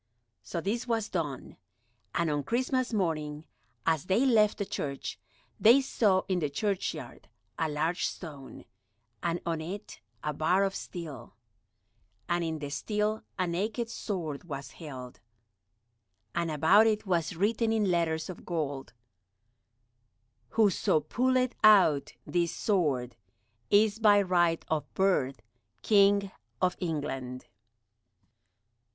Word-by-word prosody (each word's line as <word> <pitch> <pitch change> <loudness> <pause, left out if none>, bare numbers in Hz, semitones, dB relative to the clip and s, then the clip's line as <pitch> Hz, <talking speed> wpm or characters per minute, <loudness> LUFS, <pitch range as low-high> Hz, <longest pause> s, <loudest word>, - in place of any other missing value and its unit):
So 170 - -4
this 225 +8 -2
was 225 -2 0
done. 150 -7 -4 0.6
And 170 -1 +1
on 145 -1 0
Christmas 255 - 0
morning, 155 -7 -2 0.4
as 160 -2 +1
they 195 +8 +2
left 215 -5 +4
the 200 - -2
church, 140 -6 -4 0.4
they 235 +5 +7
saw 205 -8 +2
in 185 -2 +1
the 150 -4 -1
churchyard 200 +5 -3 0.3
a 160 -1 +1
large 160 +4 0
stone, 145 -6 -9 0.6
and 170 0 -1
on 165 -2 -1
it 190 - -7 0.2
a 150 - -1
bar 170 +6 +2
of 195 -1 0
steel, 155 -12 -7 0.9
and 175 0 0
in 160 -1 -2
the 145 -2 -6
steel 210 +6 -1 0.2
a 185 - +1
naked 215 +7 -2
sword 170 -10 -4
was 140 -4 -6
held, 130 -6 -9 1.1
and 170 -1 -1
about 160 +9 +5
it 215 -1 0
was 175 -3 0
written 220 +5 +1
in 210 -4 +2
letters 160 -2 0
of 185 - -8
gold, 145 -6 -3 1.6
"Whoso 210 -7 +3
pulleth 255 - +1
out 190 -10 +5
this 170 -1 0
sword 145 - 0 0.5
is 210 +1 +4
by 210 -2 +6
right 175 -3 +2
of 150 -2 -2
birth 135 -11 +1 0.4
King 200 -1 +4 0.3
of 180 -1 +1
England." 140 -6 -4
175 Hz, 120 wpm, -29 LUFS, 155-210 Hz, 1.6 s, they